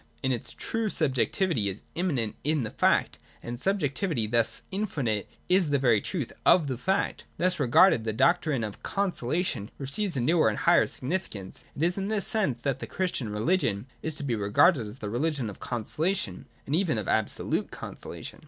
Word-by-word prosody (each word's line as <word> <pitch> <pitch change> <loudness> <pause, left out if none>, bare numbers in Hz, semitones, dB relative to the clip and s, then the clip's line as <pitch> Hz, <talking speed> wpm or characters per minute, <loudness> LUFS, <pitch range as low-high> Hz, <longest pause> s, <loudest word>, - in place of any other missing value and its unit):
In 130 - +1
its 120 - -3
truth 225 -2 -2
subjectivity 135 - +1
is 95 +2 -7
immanent 140 - -1
in 150 -2 +1
the 110 - -4
fact, - - +2 0.2
and 120 - -5
as 120 - -6
a - - -7
subjectivity 170 - 0
thus 115 +1 +1
infinite 145 - -2 0.2
is 180 -3 +3
the 145 - +3
very 120 -6 +3
truth 150 - -3
of 170 -4 +5
the 130 -4 -3
fact. 190 +7 -1
Thus 180 0 +1
regarded, 130 0 +5
the 110 - -1
doctrine 155 0 +2
of 105 -2 -6
consolation 170 - -1
receives 160 +6 0
a - - +1
newer 155 +2 +3
and 105 - -3
a - - -4
higher - - +5
significance. 125 - -5
It 150 - -2
is 175 +3 +1
in 195 - -2
this 210 -3 +1
sense 190 - 0
that 135 -2 0
the - - -6
Christian 180 - -2
religion 105 - 0 0.2
is 160 -1 -1
to 150 - -3
be 125 -4 0
regarded 115 - +3
as 105 +4 -9
the 105 -5 -5
religion 135 -2 -1
of 95 - -13
conso 120 -3 -5
lation, 160 - 0 0.2
and 140 - 0
even 170 - +1
of 105 - -3
absolute 110 -1 0
consolation. - - -8
140 Hz, 190 wpm, -28 LUFS, 115-180 Hz, 0.2 s, of